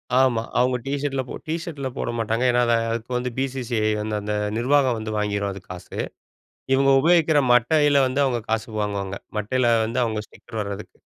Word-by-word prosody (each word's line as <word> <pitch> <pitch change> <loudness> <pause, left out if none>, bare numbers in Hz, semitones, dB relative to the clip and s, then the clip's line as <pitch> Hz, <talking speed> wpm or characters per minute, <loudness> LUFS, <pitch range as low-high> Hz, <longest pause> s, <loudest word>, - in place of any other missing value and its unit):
ஆமா. 130 -3 +4 0.2
அவுங்க 125 0 +3
டீ 140 - -3
ஷர்டில 135 -2 -1
போ - - -6
டீ 155 - -1
ஷர்ட்டில 145 -6 -5
போட - - -2
மாட்டாங்க. 115 +2 0
ஏன்னா 120 0 +3
அதை 120 - +4 0.2
அதுக்கு 115 +1 -4
வந்து 125 +1 -2
பி.சி.சி.ஐ 125 -5 -1
வந்து 105 0 -3
அந்த 105 +1 -3 0.2
நிர்வாகம் 130 +1 +3
வந்து 110 0 -5
வாங்கிரும் 100 -1 -1
அதுக்கு 95 -1 -11
காசு. 90 0 -10 0.8
இவுங்க 135 +1 +4
உபயோகிக்கிற 165 -1 +4
மட்டையில 140 +4 +4
வந்து 130 +2 0
அவங்க 125 -3 0
காசு 110 +2 -1
வாங்குவாங்க. 100 -2 -2 0.2
மட்டையில 120 +3 +1
வந்து 115 +3 -1
அவங்க 110 -2 -2
ஸ்டிக்கர் 110 - -8
வர்றதுக்கு. 100 0 -7
120 Hz, 180 wpm, -23 LUFS, 110-135 Hz, 0.8 s, ஆமா